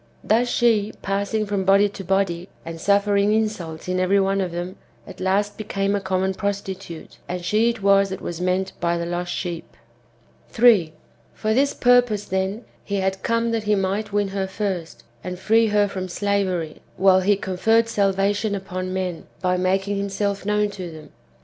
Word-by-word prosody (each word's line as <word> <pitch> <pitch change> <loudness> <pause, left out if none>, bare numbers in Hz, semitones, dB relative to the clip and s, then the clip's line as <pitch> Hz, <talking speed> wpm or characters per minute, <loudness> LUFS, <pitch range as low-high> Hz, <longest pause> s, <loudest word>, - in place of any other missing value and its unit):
Thus 235 +3 +2
she, 220 -4 +2
passing 200 +2 -1
from 200 -2 -1
body 195 +2 +5
to 195 - -9
body, 185 -1 0 0.2
and 165 0 -7
suffering 200 +1 +3
insults 200 -8 -2
in 185 0 0
every 190 +2 +3
one 195 0 +1
of 185 -2 -2
them, 175 +2 -5 0.3
at - - -11
last 200 +3 0
became 200 -1 -1
a 200 - 0
common 190 0 0
prostitute; 195 -4 -5
and 180 0 -4
she 220 +4 +3
it 230 -4 -4
was 195 0 +4
that 190 - -5
was 175 0 -5
meant 185 +1 0
by 170 0 0
the 170 - -3
lost 175 +1 -3
sheep.^ 170 -2 -5 0.7
3. 215 -9 +4 0.4
For 215 0 0
this 275 +4 +2
purpose, 245 -4 +3
then, 190 +4 -2 0.2
he 200 - -3
had 190 -1 -1
come 230 0 0
that 225 -2 -1
he 210 0 +3
might 200 +2 -1
win 205 -1 0
her 195 0 -2
first, 190 -4 -4 0.2
and 180 0 -5
free 225 +4 +3
her 205 -1 +3
from 190 -2 -5
slavery, 185 -4 -1 0.2
while 190 0 +5
he 200 +2 +3
conferred 220 +5 +2
salvation 200 0 +1
upon 185 -1 -5
men, 180 -3 -3
by 180 -1 +1
making 195 +2 0
himself 200 0 -2
known 210 0 +1
to 185 -3 -6
them. 155 -1 -12
195 Hz, 175 wpm, -22 LUFS, 185-205 Hz, 0.7 s, body